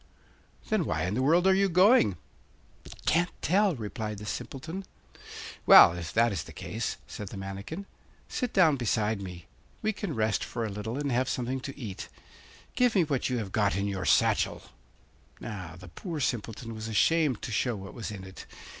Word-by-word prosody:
'Then - - +2
why 80 0 -1
in 90 +2 -1
the 125 - 0
world 165 +7 +4
are 190 - +6
you 195 +1 +3
going?' 180 - +5 0.9
'Can't 175 +2 +3
tell,' 195 0 +3
replied 105 -2 -5
the 105 - -8
Simpleton. 160 - -5 0.8
'Well, - - +10
if 85 -2 -5
that 115 +1 +4
is 95 -6 -2
the - - -11
case,' - - -4
said 105 - -7
the - - -8
manikin, 100 - -6 0.4
'sit 250 -4 -2
down 165 -7 +4
beside 110 -3 0
me; 90 -3 -8 0.4
we 220 +1 +1
can 195 -7 -4
rest 110 -1 +1
for 115 -2 -3
a - - -3
little 105 +5 -4
and 145 -1 -1
have 125 +2 +1
something 125 +1 -2
to 140 +2 -7
eat. 105 -5 -6 0.6
Give 250 -3 +2
me 185 - +5
what 140 -5 -1
you 125 - 0
have 105 -5 -4
got 105 -2 +2
in 100 +1 0
your 95 -2 -3
satchel.' - - +2 0.8
Now, 90 -7 -7
the 90 +1 -12
poor 160 - -6
Simpleton 115 -2 -3
was 110 0 -6
ashamed 145 +3 +2
to - - -4
show 120 +2 0
what 95 -1 -8
was 115 - -5
in 100 -3 -7
it. 95 0 -11
115 Hz, 185 wpm, -29 LUFS, 100-160 Hz, 0.9 s, Well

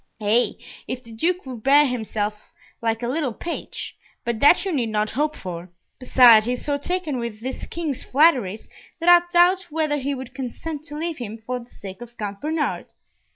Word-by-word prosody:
"Ay, 220 +3 +2 0.3
if 255 0 -5
the 230 - -13
Duke 345 +11 -1
would 250 -4 -7
bear 285 +4 +6
himself 215 -4 -3 0.3
like 225 0 -1
a - - 0
little 260 -3 -1
page; 340 - -5 0.3
but 235 -2 -1
that 315 - +6
you 385 - -1
need 250 -8 0
not 215 0 0
hope 300 +5 0
for. 175 0 -7 0.3
Besides, 240 -4 +6
he 245 - +1
is 250 - -5
so 285 -1 0
taken 320 -4 -1
with 235 -3 -5
this 260 +2 -5
King's 315 -6 -4
flatteries, 255 - +2 0.3
that 335 - -4
I 350 0 +9
doubt 360 +1 +4
whether 305 -1 0
he 280 +1 -2
would 255 -1 -8
consent 280 +4 -5
to 295 -2 -6
leave 325 -1 -3
him 225 -2 -6
for 250 +1 -2
the 240 0 -14
sake 195 +2 -10
of 240 0 -11
Count 200 -2 -5
Bernard. 310 0 -2
255 Hz, 195 wpm, -23 LUFS, 225-305 Hz, 0.3 s, I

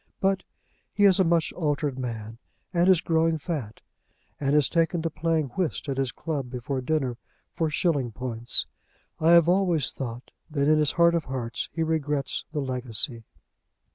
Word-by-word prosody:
But 195 0 +1 0.5
he 205 - 0
is 195 -2 +5
a - - +6
much 165 -2 +1
altered 145 -4 -1
man, 115 -2 -5 0.3
and 175 +1 +3
is 185 -4 +5
growing 165 0 +2
fat, 140 -9 -5 0.6
and 140 0 +1
has 150 -4 +5
taken 165 0 +1
to 165 - -1
playing 160 -3 0
whist 165 +3 -2
at 135 -1 -2
his 135 -2 0
club 145 -6 -4
before 130 +2 -3
dinner 130 -3 -1 0.4
for 160 -1 0
shilling 145 -6 0
points. 120 0 -1 0.5
I 165 +2 +5
have 170 -1 +7
always 175 -7 +2
thought 120 -2 -7 0.2
that 145 -2 0
in 155 0 +5
his 150 -1 +2
heart 170 0 +4
of 170 -3 0
hearts 125 -3 -3
he 165 +1 -1
regrets 150 -3 -1
the 150 -2 -2
legacy. 125 -2 0
150 Hz, 170 wpm, -26 LUFS, 130-165 Hz, 0.6 s, have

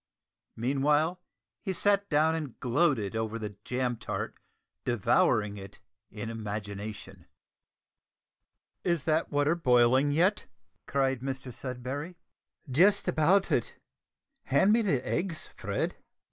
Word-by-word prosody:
Meanwhile, 145 +8 +1 0.4
he 190 -3 -2
sat 200 +2 +2
down 155 +1 +3
and 150 -6 -5
gloated 125 - +1
over 110 0 -2
the 105 -2 -6
jam 125 -1 -1
tart, - - -4 0.5
devouring 105 -2 +2
it 95 -1 -10 0.3
in 110 +1 -6
imagination. 105 -1 -6 1.6
"Is 170 -5 0
that 160 0 +1
water 145 +2 +2
boiling 130 -2 +4
yet?" 185 +8 +2 0.4
cried 135 -2 +1
Mr 130 -1 -5
Sudberry. 135 +6 -5 0.5
"Just 175 +12 +4
about 180 +4 +3
it. 120 - 0 0.7
Hand 140 +10 +4
me 230 - +4
the 150 - 0
eggs, 170 -2 -2
Fred." - - -2
135 Hz, 110 wpm, -29 LUFS, 115-165 Hz, 1.6 s, boiling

